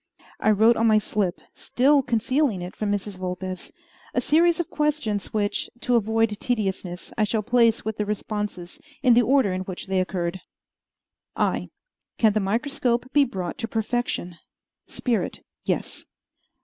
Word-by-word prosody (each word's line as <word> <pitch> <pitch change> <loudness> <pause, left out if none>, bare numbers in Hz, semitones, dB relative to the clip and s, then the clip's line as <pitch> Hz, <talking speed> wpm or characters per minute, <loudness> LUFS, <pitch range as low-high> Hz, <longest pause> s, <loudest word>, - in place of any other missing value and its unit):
I - - +2
wrote 220 +3 +5
on 230 - +3
my 215 -1 +5
slip 205 -3 -1
still 275 +3 +3
concealing 245 -3 0
it 180 - -7
from 210 -1 -1
Mrs. 200 -1 -3
Vulpes 185 0 -5 0.4
a - - +4
series 335 +3 +3
of 345 - -2
questions 290 -10 -1
which, 205 -1 -1
to 245 - +2
avoid 225 0 +2
tediousness, 190 -6 -2
I - - +4
shall 215 +1 0
place 230 -1 +3
with 220 -1 -3
the 210 - -1
responses, 210 -4 -4 0.2
in 250 -3 +6
the 240 - +6
order 250 -4 +3
in 185 - -2
which 185 -1 -6
they 190 -1 +1
occurred: 185 -1 -3 0.9
I. - - 0 0.5
Can 220 -3 +4
the 215 - +2
microscope 245 +4 -1
be 290 -1 +5
brought 185 -7 -5
to 225 - -2
perfection? 220 -6 -2 0.5
Spirit 240 -4 -2 0.2
Yes. - - -2
215 Hz, 150 wpm, -24 LUFS, 195-245 Hz, 0.9 s, in